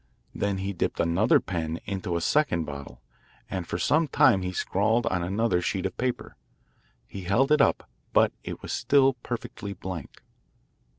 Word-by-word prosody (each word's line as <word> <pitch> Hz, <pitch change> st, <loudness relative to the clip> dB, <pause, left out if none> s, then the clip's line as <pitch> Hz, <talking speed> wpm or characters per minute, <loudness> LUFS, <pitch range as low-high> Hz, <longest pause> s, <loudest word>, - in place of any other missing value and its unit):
Then 100 Hz, -1 st, -1 dB
he 95 Hz, +1 st, -3 dB
dipped 90 Hz, -, -2 dB
another 85 Hz, 0 st, +3 dB
pen 85 Hz, -3 st, -3 dB
into 95 Hz, -3 st, -3 dB
a 85 Hz, -, -1 dB
second 115 Hz, -, +2 dB
bottle, 70 Hz, -4 st, -9 dB, 0.5 s
and 90 Hz, -3 st, -3 dB
for -, -, -2 dB
some 155 Hz, -, +2 dB
time 135 Hz, -10 st, +4 dB
he 90 Hz, 0 st, -2 dB
scrawled 110 Hz, +5 st, +1 dB
on 90 Hz, -6 st, 0 dB
another 95 Hz, +1 st, +1 dB
sheet 95 Hz, +1 st, -2 dB
of -, -, -3 dB
paper. 125 Hz, -1 st, -3 dB, 0.7 s
He 95 Hz, +7 st, -8 dB
held 125 Hz, +10 st, +2 dB
it 150 Hz, -, +5 dB
up, -, -, +2 dB, 0.2 s
but -, -, +4 dB
it -, -, -7 dB
was -, -, -4 dB
still 135 Hz, -1 st, +4 dB
perfectly 120 Hz, -4 st, -6 dB
blank. 90 Hz, -5 st, -8 dB
95 Hz, 165 wpm, -27 LUFS, 85-120 Hz, 0.7 s, it